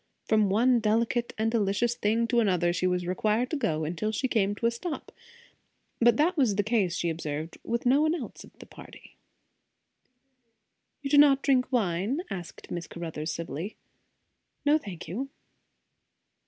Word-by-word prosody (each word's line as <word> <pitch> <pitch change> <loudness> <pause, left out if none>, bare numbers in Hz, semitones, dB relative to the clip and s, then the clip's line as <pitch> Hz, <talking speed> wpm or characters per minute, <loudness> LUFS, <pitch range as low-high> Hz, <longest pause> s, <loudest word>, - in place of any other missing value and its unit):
From 215 -2 +3
one 240 +5 +4
delicate 230 +2 +1
and 220 +1 +1
delicious 225 +1 +1
thing 230 0 +1
to 240 - +3
another 180 -5 +2
she 185 - 0
was 180 -1 0
required 215 +7 0
to - - 0
go, 160 - -1
until 170 +7 -2
she 260 +5 -1
came 205 -4 +1
to 230 - -4
a 230 - +4
stop; 300 +8 -6 0.9
but 235 -1 +5
that 335 +5 +2
was 255 -10 +2
the 205 - +1
case, 205 -5 +1
she 175 - -1
observed, 155 0 -5
with 235 +1 -2
no 265 +4 +4
one 315 +2 +2
else - - -7
of - - -15
the - - -12
party. - - -14 1.9
"You 275 - -3
do 290 - +6
not 275 -2 +6
drink 260 -2 +2
wine?" 215 - 0
asked 180 -3 -7
Miss 175 -1 -4
Caruthers 160 -2 -5
civilly. 165 +5 -5 0.9
"No, 300 +2 +4
thank 185 - -8
you." 245 - -4
215 Hz, 165 wpm, -28 LUFS, 180-250 Hz, 1.9 s, do